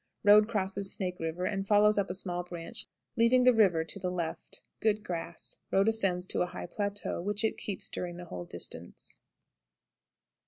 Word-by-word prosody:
Road 210 +1 +7
crosses 195 -2 -1
Snake 180 -4 -3
River, 165 +2 -2
and 195 0 -2
follows 210 0 +5
up 195 - -1
a 180 - -2
small 180 -2 -1
branch, 175 +5 -2 0.3
leaving 240 +2 +4
the 250 0 +7
river 190 -8 +4
to 180 +5 -3
the 180 - -2
left. 170 -3 -4 0.2
Good 215 -1 +1
grass. 170 -2 -5
Road 195 +3 +3
ascends 195 -5 +1
to - - +2
a 180 - +2
high - - -7
plateau, 205 0 -3
which 205 +4 0
it 220 - +1
keeps 200 -3 -4
during 175 -1 -4
the 175 - -8
whole 90 - -7
distance. 85 0 -6
195 Hz, 180 wpm, -30 LUFS, 175-210 Hz, 0.3 s, Road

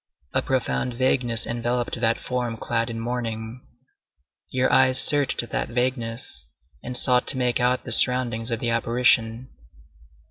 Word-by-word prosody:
A - - +1
profound 130 -1 -2
vagueness 120 -2 +1
enveloped 120 +1 -3
that 115 0 +1
form 120 -3 -4
clad 115 +1 -2
in 115 -1 -6
mourning. 115 0 -5 0.9
Your 130 0 0
eyes 130 -1 +5
searched 140 -4 +4
that - - -3
vagueness, 120 -1 -3 0.3
and 125 0 -6
sought 125 -1 +1
to - - +4
make 125 -1 0
out 125 +1 0
the 120 - -7
surroundings 120 -1 +3
of 115 -2 -2
the 120 -1 -2
apparition. 115 +1 +1
120 Hz, 140 wpm, -23 LUFS, 115-125 Hz, 0.9 s, eyes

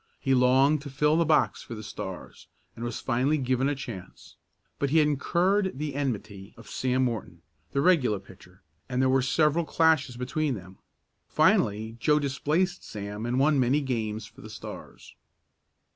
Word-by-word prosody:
He 135 - +1
longed 130 +4 +4
to 140 - -8
fill 150 +3 +2
the 165 0 +3
box 155 -2 +2
for 115 - -8
the 110 - -8
Stars, - - -8 0.3
and 115 - -7
was 120 -2 -4
finally 130 +5 +1
given 130 0 0
a 145 - -1
chance. 120 -9 -9 0.4
But 140 - 0
he 160 - +2
had 150 -2 +5
incurred 180 +5 +1
the 150 0 -3
enmity 110 -8 -4
of 115 - -14
Sam 130 0 0
Morton, 95 -8 -5 0.3
the 140 - 0
regular 140 - +3
pitcher, 95 -1 -17 0.3
and 125 -1 -1
there 130 0 +3
were 130 0 +3
several 150 +5 +2
clashes 155 -6 +2
between 135 +3 -1
them. 95 -1 -12 0.5
Finally 110 +2 +2
Joe 150 +6 +3
displaced 150 +6 0
Sam 105 +2 -6
and 125 +1 0
won 140 +1 +3
many 130 +3 +3
games 115 -6 -3
for - - -15
the - - -10
Stars. - - -10
130 Hz, 170 wpm, -27 LUFS, 115-150 Hz, 0.5 s, had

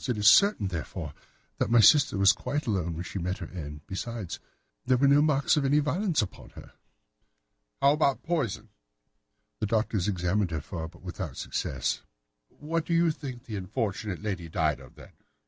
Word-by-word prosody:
It 120 - 0
is 105 0 +3
certain, 160 - +6
therefore, 85 -5 -5 0.5
that - - +1
my 120 0 +5
sister 140 -1 +6
was 100 0 +6
quite 145 +6 -3
alone 90 -7 -1
when 85 - -4
she 95 - -5
met 90 +2 -2
her 85 - -6
end. 75 -4 -7
Besides, 100 -2 -5 0.4
there 130 0 +3
were 140 +2 +4
no 140 +1 +6
marks 150 0 +3
of 145 - +2
any 140 +2 +3
violence 155 - +1
upon 100 - -9
her." - - -12 1.1
"How 140 - +7
about 145 -2 +1
poison?" 115 - -2 0.9
"The 105 - -1
doctors 105 -3 0
examined 95 0 0
her 80 -3 -3
for 80 +1 -6
it, - - -7
but 85 - -18
without 90 - -6
success." 65 -2 -2 0.5
"What 165 +2 -3
do 170 - -1
you 165 -1 +4
think 135 -5 -7
that - - -30
this 105 - -2
unfortunate 100 0 -3
lady 90 -6 -3
died 80 -3 0
of, 65 -2 -15
then?" - - -14
105 Hz, 185 wpm, -28 LUFS, 90-140 Hz, 1.1 s, How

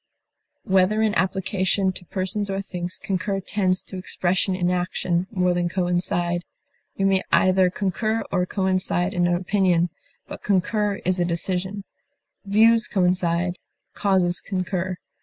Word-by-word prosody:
Whether 195 +3 +3
in 215 -1 +2
application 190 0 0
to 185 0 -10
persons 195 +3 -2
or 195 0 -1
things, 180 -2 -5
concur 195 +1 -2
tends 185 -1 0
to 190 - -8
expression 185 +1 0
in 180 -1 0
action 180 0 -1
more 180 -3 +1
than 175 0 0
coincide; 175 -1 0 0.5
we 195 - +1
may 195 -1 +3
either 185 0 +4
concur 215 +4 -1
or 180 -1 +1
coincide 185 -1 0
in 175 -1 +2
an 175 - +2
opinion, 180 -2 +1 0.4
but - - -8
concur 205 +1 +1
in 185 -1 -1
a - - +4
decision; 185 +3 -2 0.6
views 225 +3 +4
coincide, 180 -1 +1 0.3
causes 185 -3 +1
concur. 185 -1 -2
185 Hz, 135 wpm, -23 LUFS, 180-195 Hz, 0.6 s, either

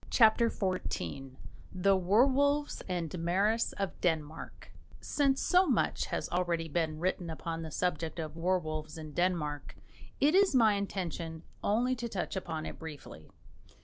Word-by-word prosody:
CHAPTER 230 0 +5
XIV 135 - -3 0.4
THE 195 +1 +3
WERWOLVES 270 +10 +2
AND 175 -3 -2
MARAS 200 +7 +1
OF 195 -1 -4
DENMARK 160 -2 -3 0.3
Since 275 -2 +1
so 365 0 +4
much 255 -7 +1
has - - -2
already 170 -2 0
been 160 0 -1
written 180 0 -1
upon 165 +1 -4
the 160 - -5
subject 165 0 -2
of 160 -1 -5
werwolves 155 -3 -1
in 155 -1 -7
Denmark, 150 -5 -1 0.4
it 295 +3 +4
is 385 -5 +5
my 225 -4 +6
intention 175 -5 -4 0.2
only 245 +5 +2
to 235 0 -4
touch 195 -2 -3
upon 160 -4 -4
it - - -7
briefly. 150 - -9
180 Hz, 140 wpm, -31 LUFS, 160-220 Hz, 0.4 s, my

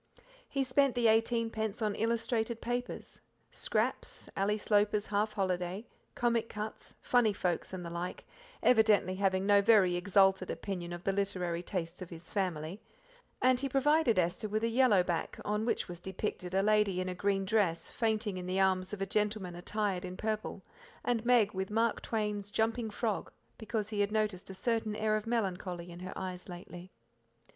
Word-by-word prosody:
He 275 - 0
spent 265 0 +2
the 240 -1 +1
eighteenpence 225 -1 +2
on 215 -2 0
illustrated 230 +1 0
papers 245 +1 -4 0.3
Scraps, - - -1
Ally 200 +2 +1
Sloper's 210 0 +2
Half 210 +1 0
Holiday, 185 +1 -1 0.3
Comic 235 -2 +1
Cuts, 215 +1 -6
Funny 240 -4 +3
Folks, 180 -4 -1
and 185 -2 -5
the 170 - -6
like, 175 +1 -5 0.4
evidently 215 -5 +5
having 190 0 +1
no 200 0 +6
very 200 -4 +5
exalted 190 0 +3
opinion 180 -3 -4
of 175 0 -6
the 195 - +1
literary 185 -4 -1
tastes 175 -1 -4
of 180 - -6
his 165 0 -8
family; 180 -1 -2 0.6
and 255 -1 +5
he 275 +1 -1
provided 275 -2 +3
Esther 180 +4 +1
with 215 +2 -1
a - - +3
yellow 230 -5 +4
back 175 -2 -2
on 210 +1 0
which - - 0
was 175 -1 -7
depicted 190 0 -4
a 195 - +3
lady 210 -3 +3
in 185 - -2
a 185 - -2
green 195 +1 0
dress 190 -5 +1
fainting 220 -3 -1
in 180 0 -5
the 185 +1 0
arms 190 0 +2
of 195 -1 -2
a - - 0
gentleman 205 -2 -1
attired 195 +1 -2
in 180 0 -6
purple, 215 -3 -3 0.4
and 235 -2 +1
Meg 235 -4 +4
with 190 0 -3
Mark 225 +1 +1
Twain's 210 -2 -2
"Jumping 225 +2 0
Frog", 215 -1 -2 0.3
because 220 -1 -2
he 210 -2 -3
had 205 0 +2
noticed 210 -4 -1
a 190 - -7
certain 225 0 -1
air 215 0 +1
of 215 +1 -3
melancholy 180 -6 -2
in 170 - -9
her 185 +1 -6
eyes 185 0 -5
lately. 175 0 -9
205 Hz, 175 wpm, -32 LUFS, 185-220 Hz, 0.6 s, no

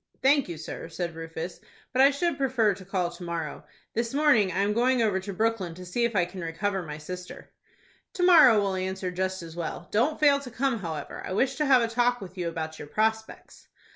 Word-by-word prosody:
"Thank 275 -4 +4
you, 170 - -5
sir," 160 +1 -7
said 170 0 -4
Rufus; 165 +2 -6 0.3
"but 260 - +3
I 275 - +8
should 335 +5 0
prefer 245 -6 +2
to 190 0 -11
call 185 -2 -1
to 175 - -13
morrow. 165 -3 -4 0.3
This 230 +3 -2
morning, 280 -10 +4
I 185 - 0
am 205 +1 +1
going 250 +3 +2
over 210 -4 +2
to 195 +2 -6
Brooklyn 200 -4 -1
to 180 +1 -10
see 235 +7 0
if 235 -2 -2
I 180 -3 +3
can 185 +1 -8
recover 190 +4 -2
my 150 -3 -7
sister." 180 +4 -9 0.6
"To 360 - -2
morrow 315 -11 +7
will 200 -1 0
answer 190 0 -3
just 185 0 -2
as 165 -1 -10
well. 170 0 -5
Don't 250 +9 +1
fail 285 -2 +5
to 275 -3 -9
come, 245 0 -1
however, 165 -5 -6
I - - -4
wish 260 +7 +1
to 300 -1 +1
have 260 -3 +6
a - - +1
talk 245 +1 +1
with 190 -2 -10
you 180 -2 -3
about 160 -1 -5
your 145 - -8
prospects." 220 +5 -2
195 Hz, 225 wpm, -27 LUFS, 175-245 Hz, 0.6 s, I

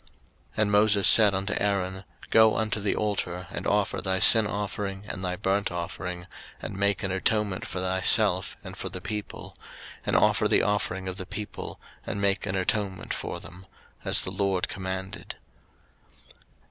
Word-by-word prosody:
03:009:007 - - -23 0.5
And 105 - -1
Moses 105 -1 +4
said 105 -4 +8
unto 100 +2 -2
Aaron, 95 -2 -1 0.3
Go 110 -1 +5
unto 110 -1 -1
the 100 0 -1
altar, 90 -4 -2
and - - -4
offer 100 -1 0
thy 95 -1 0
sin 110 +2 +7
offering, 100 0 -4
and 95 -2 -6
thy 90 -1 -2
burnt 100 +1 -1
offering, 90 0 -5 0.3
and - - -7
make 100 +2 +1
an 95 - -1
atonement 100 0 0
for 90 - -5
thyself, 95 +1 +2
and - - -9
for - - -5
the 95 - -7
people: 105 +2 -6 0.5
and - - -1
offer - - +3
the - - +3
offering 95 -2 -1
of 95 0 -5
the 95 - -6
people, 105 +1 -7 0.2
and 100 - -4
make 100 0 0
an 95 - -2
atonement 95 0 -2
for - - -5
them; 90 +1 -12 0.4
as - - +4
the 95 - -4
LORD 95 -1 0
commanded. 95 +1 -6
95 Hz, 165 wpm, -26 LUFS, 95-105 Hz, 0.5 s, said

